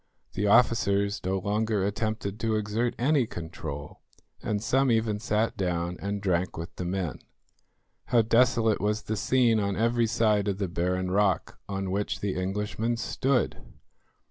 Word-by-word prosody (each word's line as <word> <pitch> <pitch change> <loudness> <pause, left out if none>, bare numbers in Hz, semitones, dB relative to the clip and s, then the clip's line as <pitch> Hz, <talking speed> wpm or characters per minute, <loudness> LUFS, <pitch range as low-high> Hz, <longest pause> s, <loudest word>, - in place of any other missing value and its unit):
The 105 +2 0
officers 100 -3 +3
no 95 +1 0
longer 105 +1 0
attempted 105 0 -2
to 115 -1 0
exert 110 +3 -1
any 135 -1 +2
control, 75 -5 -7 0.4
and 105 - -1
some 130 +5 +2
even 110 -2 +1
sat 110 +1 0
down 90 -2 -1
and 100 0 -3
drank 90 -2 0
with 85 +1 -7
the 90 - -3
men. 90 -4 -2 0.9
How 120 -2 +3
desolate 115 -1 +3
was 105 +1 0
the 110 - -2
scene 120 0 +3
on 100 -1 -1
every 115 +1 +2
side 110 -2 +2
of 100 -2 0
the 100 -2 -1
barren 90 +2 -1
rock 95 -3 +1
on 95 -1 -3
which 95 -3 -1
the 100 -1 -2
Englishmen 105 +5 -2
stood! 130 +2 0
105 Hz, 150 wpm, -27 LUFS, 95-115 Hz, 0.9 s, officers